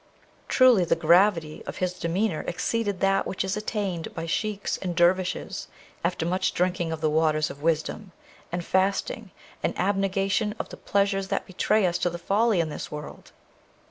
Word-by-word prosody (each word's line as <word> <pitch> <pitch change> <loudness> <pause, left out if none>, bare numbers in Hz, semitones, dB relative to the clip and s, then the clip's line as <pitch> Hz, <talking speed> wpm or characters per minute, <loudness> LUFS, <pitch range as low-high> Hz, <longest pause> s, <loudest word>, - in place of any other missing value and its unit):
Truly 255 -7 +5
the 170 - +2
gravity 165 -1 +3
of - - -5
his 180 -1 -1
demeanour 180 +1 -1
exceeded 200 +2 -1
that 195 0 +2
which 190 - -2
is 190 +1 -1
attained 205 -5 -3
by 165 - -4
Sheiks 205 +4 -2
and 180 -2 -4
Dervishes 180 +1 +1 0.4
after 170 -1 0
much 185 +2 0
drinking 180 -2 0
of 160 -1 -4
the 155 - +2
waters 155 -1 +2
of 145 - -12
wisdom, 165 +5 -1 0.4
and 175 0 -3
fasting, 195 +2 0 0.3
and - - -1
abnegation 195 +2 0
of - - -5
the - - -9
pleasures 200 -1 0
that - - -2
betray 210 +2 +1
us 175 -1 0
to 175 -1 -1
folly 205 +3 +2
in 165 -2 +1
this - - -6
world! 150 0 -8
185 Hz, 165 wpm, -26 LUFS, 170-200 Hz, 0.4 s, Truly